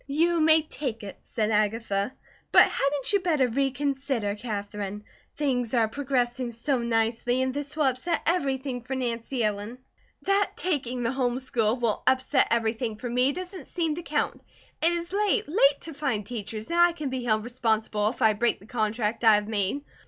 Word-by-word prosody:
"You 335 +4 +2
may 315 0 +6
take 255 -7 -5
it," 200 - -8
said 220 -1 -2
Agatha, 210 0 0 0.4
"but - - +9
hadn't 280 +5 0
you 405 - +5
better 315 -8 +2
reconsider, 270 -3 -1
Katherine? 205 -2 -5 0.3
Things 255 -5 0
are 230 -2 +3
progressing 250 -1 -1
so 245 +3 -1
nicely, 235 +1 0
and 260 0 -1
this 290 +2 -5
will 305 - +2
upset 270 +6 +1
everything 270 -6 0
for 255 +3 -5
Nancy 240 0 -2
Ellen." 210 +3 -2 0.5
"That 395 +1 +2
taking 255 -8 -1
the 230 - 0
home 250 -2 0
school 235 -4 +1
will 235 -4 -1
upset 260 +1 +3
everything 225 0 0
for 245 +2 -5
me, 250 +3 +3
doesn't 370 +3 -7
seem 330 -3 -1
to 340 - -5
count. 300 -2 -2 0.4
It 330 - +4
is 345 +1 -3
late, 420 +1 +1
late 290 -4 +3
to 325 - -6
find 265 -8 -2
teachers, 220 +2 -6
and 340 - +1
I 345 0 +6
can 300 -5 -4
be 260 -1 -3
held 215 -2 +1
responsible 220 -3 0
if 235 - -4
I 220 -1 +5
break 235 +3 +1
the 200 - -16
contract 220 0 -1
I 220 -2 +7
have 210 0 -1
made. 215 +6 -1
250 Hz, 180 wpm, -26 LUFS, 225-285 Hz, 0.5 s, but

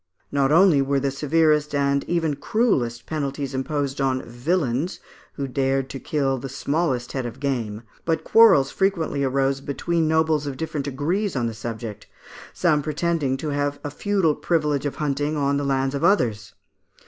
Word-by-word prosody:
Not 140 0 +2
only 165 -3 +6
were 135 0 +1
the 135 0 -1
severest 150 +1 +2
and 140 0 +1
even 165 -4 0
cruellest 140 - 0
penalties 140 -3 -3
imposed 140 0 -2
on 130 -1 0
"vilains" 135 +4 -1 0.3
who 140 - -4
dared 135 0 0
to 135 - -6
kill 135 -4 -1
the 135 - -6
smallest 140 -2 -1
head 130 -3 -3
of 120 +3 -9
game, 120 -6 -2 0.2
but 165 -1 0
quarrels 195 -13 +6
frequently 170 -7 0
arose 135 0 +1
between 160 +4 -1
nobles 160 -2 +2
of 135 -2 -4
different 150 -2 -3
degrees 165 +9 -1
on 125 -3 0
the 115 - -2
subject, 110 -2 -6 0.4
some 155 -4 +2
pretending 155 -2 -1
to 155 - -4
have 145 0 -1
a 145 - -4
feudal 190 -1 +1
privilege 150 -4 0
of 145 - -5
hunting 145 +1 -1
on 140 0 +1
the 145 - -1
lands 135 -1 0
of 140 - -3
others 110 - +2
(Fig. - - -47
140 Hz, 170 wpm, -23 LUFS, 135-160 Hz, 0.4 s, only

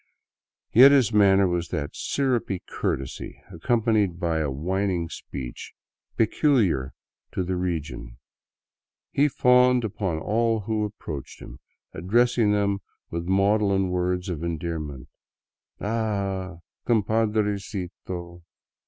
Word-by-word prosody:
Yet 130 +4 +9
his 130 -6 +4
manner 100 -2 +5
was 85 -1 -1
that 75 -3 -4
syrupy 125 -9 -1
courtesy, 65 -1 -4
accompanied 105 -1 +1
by 85 -3 0
a 75 -2 0
whining 90 +4 -1
speech, 65 -3 -8 0.4
peculiar 110 - +2 0.4
to 95 - -1
the 90 +1 -2
region. 80 -9 -4 0.9
He 145 +2 +3
fawned 125 -2 +4
upon 100 -6 -2
all 110 +5 +1
who 110 +1 -1
approached 75 -9 -7
him, - - -11 0.3
addressing 115 +5 +2
them 100 -1 +1 0.3
with 85 +1 -4
maudlin 100 0 +2
words 90 0 -1
of 85 -4 -4
endearment, 80 -5 -4 0.3
— - - -69
" - - -51
Ah, 100 -4 -2 0.3
compadrecito 100 -5 -1
95 Hz, 110 wpm, -25 LUFS, 85-110 Hz, 0.9 s, Yet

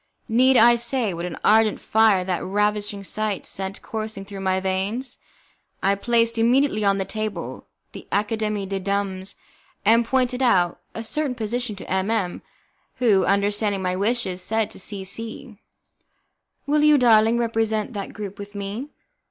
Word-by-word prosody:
Need 255 +3 +4
I 235 +1 +7
say 235 -3 0
what 170 +1 -4
an 175 - -7
ardent 220 0 +4
fire 220 -4 +3
that 180 -1 -2
ravishing 205 0 -1
sight 215 0 -3
sent 190 +1 -5
coursing 215 -3 -5
through 200 0 -8
my 190 -1 0
veins? 195 +7 -2 0.6
I 195 - +4
placed 230 +2 +1
immediately 240 -1 +3
on 200 -1 +3
the 190 - -2
table 215 0 -5 0.2
the - - -11
Academie 210 0 -1
des 195 0 -3
Dames, 195 0 -2 0.5
and 230 +3 +5
pointed 250 +1 0
out 185 -9 +2 0.2
a 225 - -4
certain 280 +2 -2
position 235 0 -3
to 195 - -10
M 190 +2 0
M, 205 -6 -1 0.5
who, 225 -7 +3
understanding 200 0 +1
my 180 0 0
wishes, 200 -2 -1
said 220 +2 0
to - - -6
C 195 0 -4
C: 225 +3 -5 1.1
"Will 295 +1 +2
you, 300 -1 +6
darling, 225 -2 +5
represent 225 -1 0
that 200 -2 -5
group 205 -2 -7
with 205 0 -9
me?" 200 +8 -5
215 Hz, 155 wpm, -23 LUFS, 195-230 Hz, 1.1 s, I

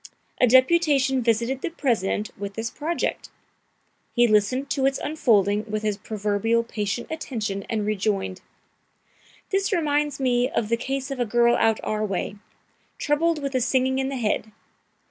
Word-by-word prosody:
A 250 - +5
deputation 270 0 +4
visited 235 +3 0
the - - -2
President 225 - -1
with 200 0 -6
this 225 0 -3
project. 330 +3 -3 0.9
He 240 -1 +5
listened 225 +6 +2
to 270 -1 +2
its 270 - 0
unfolding 210 -9 +2
with 215 0 -2
his 210 -1 0
proverbial 215 +2 0
patient 215 0 -3
attention, 215 -11 -4
and 215 -2 -1
rejoined: 195 -2 -1 1.1
"This 390 +1 +1
reminds 295 -5 0
me 250 -1 +2
of 215 - -1
the 230 - +3
case 270 +3 -3
of 270 - -4
a 245 - +1
girl 235 +2 +4
out 225 -1 +2
our 215 0 -1
way, 200 0 -3 0.6
troubled 300 +1 +1
with 275 -1 -3
a 255 - +1
singing 260 +1 +1
in 265 0 -1
the 275 - -3
head. 220 -2 -1
240 Hz, 155 wpm, -24 LUFS, 215-275 Hz, 1.1 s, A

